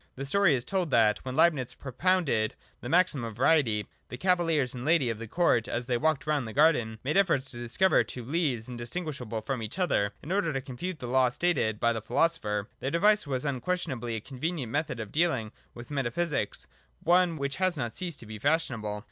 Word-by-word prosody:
The 135 Hz, -, -5 dB
story 175 Hz, +1 st, +4 dB
is 120 Hz, -, -3 dB
told 185 Hz, -4 st, -1 dB
that, 110 Hz, -5 st, +4 dB
when 130 Hz, -1 st, -6 dB
Leibnitz 140 Hz, -7 st, +2 dB
propounded 140 Hz, -5 st, 0 dB, 0.2 s
the 120 Hz, -, -7 dB
maxim 170 Hz, -5 st, +3 dB
of 115 Hz, -2 st, -5 dB
Variety, 120 Hz, -5 st, +3 dB, 0.2 s
the 125 Hz, -, -6 dB
cavaliers 165 Hz, -6 st, +1 dB
and 125 Hz, -1 st, -6 dB
ladies 150 Hz, -5 st, +3 dB
of 110 Hz, -, -6 dB
the 115 Hz, -, -6 dB
court, 140 Hz, -5 st, +2 dB
as 120 Hz, +1 st, -3 dB
they 125 Hz, 0 st, 0 dB
walked 150 Hz, +2 st, +1 dB
round 150 Hz, -5 st, 0 dB
the 110 Hz, -, -7 dB
garden, 135 Hz, -8 st, +3 dB
made 150 Hz, +7 st, 0 dB
efforts 165 Hz, -9 st, +2 dB
to 120 Hz, -, -8 dB
discover 125 Hz, +11 st, +3 dB
two 125 Hz, -2 st, -8 dB
leaves 135 Hz, -6 st, -1 dB
indistinguishable 125 Hz, -2 st, -5 dB
from 130 Hz, +1 st, -3 dB
each 110 Hz, -, -6 dB
other, 120 Hz, -, +1 dB
in 155 Hz, -, -6 dB
order 190 Hz, -4 st, +1 dB
to 135 Hz, -, -1 dB
confute 140 Hz, +7 st, -5 dB
the 125 Hz, -, -7 dB
law 130 Hz, +1 st, +3 dB
stated 125 Hz, -7 st, 0 dB
by 115 Hz, 0 st, +2 dB
the 115 Hz, -, -4 dB
philosopher. 105 Hz, -6 st, 0 dB
Their 135 Hz, -, -2 dB
device 205 Hz, +4 st, +3 dB
was 130 Hz, 0 st, -2 dB
un 135 Hz, -4 st, -2 dB
questionably 130 Hz, -10 st, -2 dB
a 110 Hz, -, -4 dB
convenient 135 Hz, 0 st, -4 dB
method 145 Hz, -4 st, -2 dB
of 110 Hz, -2 st, -6 dB
dealing 150 Hz, -10 st, +1 dB, 0.2 s
with 120 Hz, +4 st, -10 dB
meta 135 Hz, -4 st, 0 dB
physics, 155 Hz, -6 st, -2 dB, 0.2 s
— -, -, -40 dB
one 175 Hz, -1 st, +3 dB
which 140 Hz, -1 st, -3 dB
has 185 Hz, -3 st, +1 dB
not 120 Hz, -4 st, -3 dB
ceased 170 Hz, -5 st, -5 dB
to -, -, -10 dB
be 110 Hz, 0 st, -8 dB
fashionable. 115 Hz, -8 st, 0 dB
135 Hz, 210 wpm, -28 LUFS, 120-165 Hz, 0.2 s, story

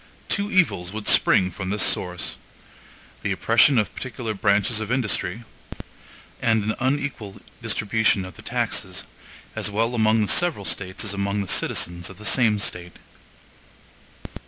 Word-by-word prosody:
Two 200 Hz, 0 st, 0 dB
evils 95 Hz, -, +2 dB
would 110 Hz, -1 st, -6 dB
spring 95 Hz, -2 st, +4 dB
from 95 Hz, +1 st, -6 dB
this 105 Hz, 0 st, +1 dB
source: 90 Hz, -1 st, 0 dB, 0.8 s
the -, -, -2 dB
oppression 140 Hz, -4 st, +4 dB
of 105 Hz, -, 0 dB
particular 120 Hz, -3 st, -5 dB
branches 100 Hz, +2 st, +1 dB
of 110 Hz, +1 st, -4 dB
industry; 115 Hz, -4 st, -1 dB, 1.0 s
and 110 Hz, -2 st, +2 dB
an 110 Hz, +1 st, -1 dB
unequal 130 Hz, -6 st, -2 dB, 0.2 s
distribution 105 Hz, -2 st, +1 dB
of 95 Hz, -, -10 dB
the -, -, -12 dB
taxes, -, -, -2 dB, 0.5 s
as -, -, -1 dB
well 115 Hz, +4 st, 0 dB
among 110 Hz, -1 st, +3 dB
the 105 Hz, -, +1 dB
several 165 Hz, -, +2 dB
States 95 Hz, +2 st, -3 dB
as 100 Hz, -, -1 dB
among 100 Hz, +1 st, -1 dB
the 100 Hz, -, -5 dB
citizens 85 Hz, -1 st, -1 dB
of 95 Hz, -, -12 dB
the 105 Hz, -, -10 dB
same 110 Hz, -2 st, +3 dB
State. 90 Hz, -3 st, -4 dB
105 Hz, 145 wpm, -23 LUFS, 95-115 Hz, 1.0 s, spring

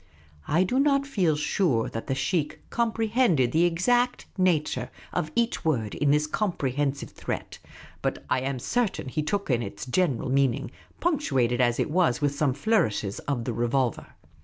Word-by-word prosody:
I 165 Hz, +5 st, +3 dB
do 250 Hz, +8 st, 0 dB
not 275 Hz, -1 st, +3 dB
feel 185 Hz, -, +1 dB
sure 150 Hz, -, +1 dB
that 115 Hz, -, -6 dB
the 135 Hz, -, 0 dB
sheikh 150 Hz, +3 st, -1 dB
comprehended 225 Hz, -, +2 dB
the 165 Hz, +5 st, +3 dB
exact 245 Hz, +9 st, +1 dB
nature 180 Hz, -5 st, +1 dB, 0.2 s
of 155 Hz, -3 st, -1 dB
each 235 Hz, 0 st, 0 dB
word 115 Hz, -10 st, 0 dB
in 145 Hz, -, +1 dB
this 150 Hz, +1 st, +3 dB
comprehensive 145 Hz, -, -1 dB
threat, -, -, -5 dB, 0.4 s
but -, -, -2 dB
I 130 Hz, -, +1 dB
am 135 Hz, 0 st, -2 dB
certain 205 Hz, -, -1 dB
he 155 Hz, +4 st, -1 dB
took 195 Hz, +2 st, -1 dB
in 120 Hz, -1 st, +2 dB
its 105 Hz, +1 st, -6 dB
general 130 Hz, -3 st, 0 dB
meaning, 135 Hz, 0 st, +1 dB, 0.3 s
punctuated 135 Hz, -, +1 dB
as 120 Hz, -1 st, +2 dB
it -, -, 0 dB
was 165 Hz, -8 st, +2 dB
with 145 Hz, -1 st, +1 dB
some 140 Hz, -3 st, +1 dB
flourishes 115 Hz, -, 0 dB
of 130 Hz, -5 st, -1 dB
the 120 Hz, -, -3 dB
revolver. 120 Hz, +1 st, 0 dB
150 Hz, 160 wpm, -26 LUFS, 130-195 Hz, 0.4 s, I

